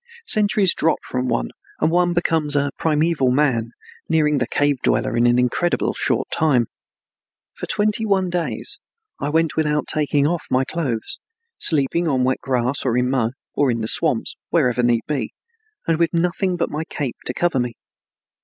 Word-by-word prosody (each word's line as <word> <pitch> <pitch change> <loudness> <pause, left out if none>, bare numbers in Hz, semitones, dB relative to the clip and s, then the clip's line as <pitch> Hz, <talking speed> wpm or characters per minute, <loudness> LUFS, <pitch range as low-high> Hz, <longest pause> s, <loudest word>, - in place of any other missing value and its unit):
Centuries 210 - +4
drop 165 - +2
from 125 0 -3
one, - - -1 0.3
and 160 - +2
one 175 0 +3
becomes 160 -4 +1
a 145 -1 +1
primeval 155 -3 +1
man, 125 -4 +1 0.4
nearing 150 -3 +2
the 125 - -1
cave 145 -1 +1
dweller - - +1
in 120 +1 +3
an 120 0 +3
incredibly 125 +8 +1
short - - 0
time. 140 -7 +2 0.9
For - - -7
twenty 210 +1 +1
one 190 -4 +1
days 175 -2 -2 0.4
I 145 - -2
went 160 +1 +1
without 150 -1 +1
taking 145 -2 +1
off 170 +2 -1
my 130 +1 +2
clothes, 130 -10 -3 0.4
sleeping 160 +3 +2
on 130 -4 +1
wet 130 +1 +1
grass 130 0 0
or 125 -2 +1
in 125 +1 +1
mud, 120 -3 0 0.2
or 145 - +2
in 115 -2 -1
the 110 - -2
swamps, - - -1
wherever 125 0 +2
need 120 -1 +2
be, 140 -7 -3 0.5
and 165 -1 +1
with 170 -1 +1
nothing 180 +2 0
but 170 - -1
my 155 +2 -2
cape 145 -6 -4
to 125 - -1
cover 175 -6 +1
me. 120 -2 -2
145 Hz, 170 wpm, -21 LUFS, 125-170 Hz, 0.9 s, Centuries